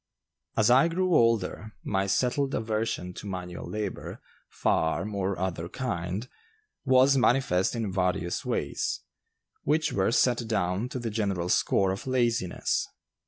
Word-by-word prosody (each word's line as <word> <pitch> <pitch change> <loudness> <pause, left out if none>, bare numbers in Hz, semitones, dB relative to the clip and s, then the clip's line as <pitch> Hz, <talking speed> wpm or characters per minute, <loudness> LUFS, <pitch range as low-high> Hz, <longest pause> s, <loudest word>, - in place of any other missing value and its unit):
As 110 +2 +4
I 135 +6 +6
grew 180 +2 0
older, 110 - +2
my 95 -1 0
settled 135 +6 +1
aversion 110 -5 -2
to 100 - -8
manual 90 -2 -6
labor, 105 -2 -4 0.3
farm 105 +6 0
or 100 -1 -1
other 90 -2 -3
kind, 100 -2 -3 0.6
was 130 0 +5
manifest 125 -7 +2
in 110 -4 -2
various 90 -2 0
ways, - - -2 0.6
which 155 +2 +1
were 95 +2 +2
set 120 -1 +2
down 100 +1 0
to 130 - -5
the 120 -2 -3
general 100 -5 -1
score 95 +1 +2
of 95 +7 -5
laziness. 120 -7 0
105 Hz, 130 wpm, -28 LUFS, 95-125 Hz, 0.6 s, I